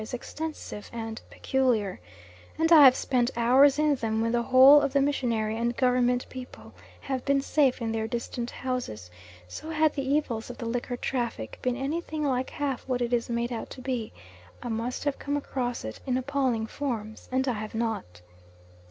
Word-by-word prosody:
is 215 Hz, +3 st, -5 dB
extensive 305 Hz, -5 st, -6 dB
and 225 Hz, -1 st, -6 dB
peculiar, 245 Hz, -7 st, 0 dB, 0.6 s
and 325 Hz, +1 st, +1 dB
I 305 Hz, -4 st, +10 dB
have 255 Hz, -1 st, +8 dB
spent 245 Hz, -2 st, +1 dB
hours 265 Hz, +4 st, +5 dB
in 300 Hz, -1 st, +3 dB
them 225 Hz, -4 st, -1 dB
when 230 Hz, +1 st, +1 dB
the 240 Hz, 0 st, +2 dB
whole 265 Hz, +4 st, +8 dB
of 280 Hz, -2 st, -1 dB
the 280 Hz, -, +4 dB
missionary 235 Hz, -6 st, 0 dB
and 235 Hz, +1 st, -1 dB
Government 250 Hz, -1 st, +2 dB
people 255 Hz, -1 st, -10 dB, 0.3 s
have 265 Hz, -2 st, -3 dB
been 280 Hz, 0 st, +2 dB
safe 275 Hz, -2 st, +2 dB
in 225 Hz, -, -1 dB
their 220 Hz, 0 st, -2 dB
distant 235 Hz, +1 st, -4 dB
houses; 245 Hz, -, -5 dB, 0.4 s
so 310 Hz, -, -8 dB
had 315 Hz, -1 st, +2 dB
the 280 Hz, -, -2 dB
evils 265 Hz, -5 st, -1 dB
of 245 Hz, -, -8 dB
the 235 Hz, -, -6 dB
liquor 245 Hz, +1 st, -3 dB
traffic 235 Hz, -, -3 dB
been 250 Hz, -1 st, 0 dB
anything 305 Hz, +3 st, -3 dB
like 260 Hz, -2 st, 0 dB
half 280 Hz, -4 st, -3 dB
what 250 Hz, -2 st, 0 dB
it 240 Hz, 0 st, -2 dB
is 235 Hz, 0 st, 0 dB
made 235 Hz, +1 st, -1 dB
out 230 Hz, -, -5 dB
to -, -, -10 dB
be 250 Hz, -4 st, -3 dB, 0.5 s
I 245 Hz, -, -4 dB
must 230 Hz, +2 st, -3 dB
have 285 Hz, -2 st, -1 dB
come 285 Hz, +1 st, -2 dB
across 245 Hz, -, -3 dB
it 110 Hz, -, -6 dB
in 255 Hz, -1 st, +1 dB
appalling 260 Hz, -4 st, 0 dB
forms, 220 Hz, -4 st, -5 dB
and 260 Hz, +1 st, +1 dB
I 255 Hz, -, +2 dB
have 215 Hz, 0 st, -6 dB
not. 215 Hz, -, -3 dB
250 Hz, 185 wpm, -27 LUFS, 230-275 Hz, 0.6 s, I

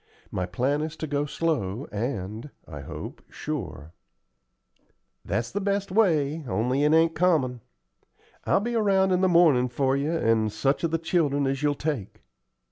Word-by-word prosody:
My 90 Hz, -1 st, -2 dB
plan 130 Hz, +11 st, 0 dB
is 155 Hz, +1 st, -4 dB
to -, -, -4 dB
go 145 Hz, 0 st, -1 dB
slow, 140 Hz, -, -2 dB
and, 110 Hz, +2 st, -4 dB, 0.2 s
I 75 Hz, -3 st, -8 dB
hope, -, -, -8 dB
sure." 90 Hz, -, -6 dB, 1.3 s
"That's 115 Hz, +4 st, -2 dB
the 205 Hz, -, -2 dB
best 200 Hz, -1 st, -1 dB
way, 160 Hz, -7 st, +2 dB
only 125 Hz, +6 st, 0 dB
it 150 Hz, -, +4 dB
ain't 165 Hz, +1 st, +4 dB
common. 155 Hz, -9 st, +1 dB, 0.8 s
I'll -, -, +3 dB
be 240 Hz, +3 st, -2 dB
around 195 Hz, -4 st, +3 dB
in 180 Hz, 0 st, +2 dB
the 190 Hz, -, +4 dB
mornin' 155 Hz, -8 st, +4 dB
for 135 Hz, +2 st, +1 dB
you 140 Hz, +3 st, -1 dB
and 115 Hz, -8 st, +1 dB
such 135 Hz, +8 st, 0 dB
of 165 Hz, -, +2 dB
the 165 Hz, -, 0 dB
children 155 Hz, -4 st, +1 dB
as 135 Hz, 0 st, -1 dB
you'll 145 Hz, -1 st, +1 dB
take." 140 Hz, -10 st, -4 dB
145 Hz, 160 wpm, -26 LUFS, 120-165 Hz, 1.3 s, it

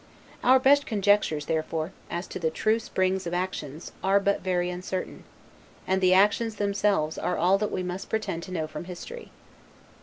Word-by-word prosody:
Our 260 Hz, +1 st, +7 dB
best 280 Hz, +2 st, +4 dB
conjectures, 205 Hz, -7 st, +2 dB
therefore, 160 Hz, +2 st, -2 dB, 0.2 s
as 175 Hz, +2 st, -3 dB
to -, -, -5 dB
the 160 Hz, -2 st, +1 dB
true 215 Hz, +8 st, +1 dB
springs 190 Hz, -3 st, -1 dB
of 170 Hz, -, -2 dB
actions, 170 Hz, -4 st, -4 dB
are 195 Hz, +1 st, +4 dB
but 200 Hz, 0 st, 0 dB
very 180 Hz, -1 st, 0 dB
uncertain; 185 Hz, +1 st, -5 dB, 0.6 s
and 190 Hz, 0 st, +1 dB
the 185 Hz, 0 st, +5 dB
actions 210 Hz, +3 st, +3 dB
themselves 200 Hz, -6 st, 0 dB
are 180 Hz, -, -1 dB
all 190 Hz, +3 st, +3 dB
that 210 Hz, -, -1 dB
we 185 Hz, -, -2 dB
must 180 Hz, +2 st, -5 dB
pretend 215 Hz, -6 st, -2 dB
to -, -, -10 dB
know 165 Hz, -4 st, -1 dB
from 155 Hz, -, -7 dB
history. 185 Hz, -, -8 dB
185 Hz, 175 wpm, -27 LUFS, 175-205 Hz, 0.6 s, Our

